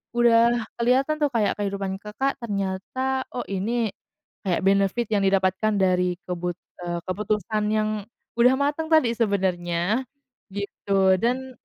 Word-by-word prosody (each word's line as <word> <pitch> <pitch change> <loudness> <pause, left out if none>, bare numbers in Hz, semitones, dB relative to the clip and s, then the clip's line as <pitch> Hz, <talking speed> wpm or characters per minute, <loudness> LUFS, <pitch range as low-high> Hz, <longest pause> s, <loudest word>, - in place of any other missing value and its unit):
udah 235 0 +4 0.2
keliatan, 265 +6 +2
tuh, 295 - +3
kayak 210 -2 +1
kehidupan 195 -1 -2
Kakak, 265 +8 -2
ternyata, 235 +5 -2
oh, 245 - -2
ini 215 +3 -1 0.6
kayak 180 +2 +1
benefit 195 +4 +2
yang 200 -2 +2
didapatkan 190 +2 +2
dari 180 -2 +2
kebut 180 -1 -3 0.3
eee, 175 0 -2
keputusan 210 +2 -1
yang 215 0 +1 0.5
udah 250 +2 +6
mateng 290 +3 -1
tadi 310 -8 +5
sebenernya, 195 0 0 0.4
gitu, 195 -1 +1
dan, 255 +2 -2
210 Hz, 125 wpm, -24 LUFS, 190-240 Hz, 0.6 s, udah